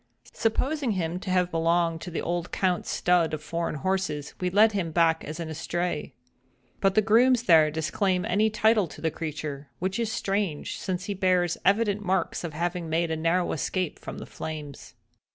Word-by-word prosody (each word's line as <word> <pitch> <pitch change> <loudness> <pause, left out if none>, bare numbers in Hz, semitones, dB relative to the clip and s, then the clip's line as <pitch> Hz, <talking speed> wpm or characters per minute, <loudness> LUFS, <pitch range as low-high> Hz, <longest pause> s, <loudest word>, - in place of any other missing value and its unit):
Supposing 260 +3 0
him 175 -1 -2
to 190 - -7
have 180 -1 +2
belonged 165 0 +1
to - - -6
the 170 - -3
old 175 0 -2
Count's 185 -2 0
stud 175 -3 +2
of 155 - -10
foreign 165 0 -2
horses, 150 -2 -2
we 180 - 0
led 210 +4 +5
him 190 -5 -1
back 165 0 +3
as 155 +3 -6
an 165 - -4
estray. 160 -1 -3 0.7
But 195 -1 +2
the 215 - +4
grooms 235 +3 +4
there 160 -7 +6
disclaim 180 +4 0
any 210 +4 +2
title 215 -2 +3
to - - -12
the 160 - 0
creature; 150 -3 -5
which 190 +4 -2
is 230 -2 -1
strange, 195 -8 -2
since 185 0 -3
he 205 - -2
bears 180 -3 +2
evident 205 0 +2
marks 185 -2 0
of 165 -3 -5
having 170 +1 -2
made 165 +1 0
a - - 0
narrow 165 +3 +1
escape 180 +2 -2
from - - -8
the - - -7
flames. 150 -3 -8
175 Hz, 185 wpm, -27 LUFS, 160-195 Hz, 0.7 s, there